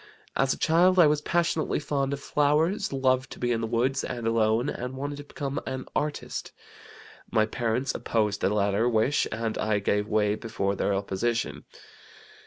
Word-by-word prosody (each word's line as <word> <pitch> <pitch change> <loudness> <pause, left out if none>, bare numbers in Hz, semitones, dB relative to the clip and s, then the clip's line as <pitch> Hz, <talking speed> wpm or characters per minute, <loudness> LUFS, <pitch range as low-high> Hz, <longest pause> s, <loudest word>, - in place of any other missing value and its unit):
As 135 -1 +2
a - - -1
child 180 +3 +4
I 175 - +8
was 150 0 +2
passionately 170 0 0
fond 140 -2 -1
of 140 - -2
flowers, 155 +9 +1
loved 130 -1 +1
to - - -13
be 120 0 0
in 115 -1 0
the 115 - -1
woods 120 +4 0
and 120 -2 -4
alone, 115 0 +2
and 125 +2 -4
wanted 145 +1 -4
to 145 - -7
become 140 -1 -4
an 130 0 -4
artist. 150 0 -3 0.8
My 110 -1 +3
parents 120 +4 -1
opposed 105 -3 -1
the - - +2
latter 100 +3 +1
wish 115 +5 +2
and 110 0 -2
I 110 -1 +1
gave 105 +1 0
way 105 -1 +2
before 105 -3 -2
their 100 +1 0
opposition. 105 +4 -2
120 Hz, 175 wpm, -27 LUFS, 110-145 Hz, 0.8 s, I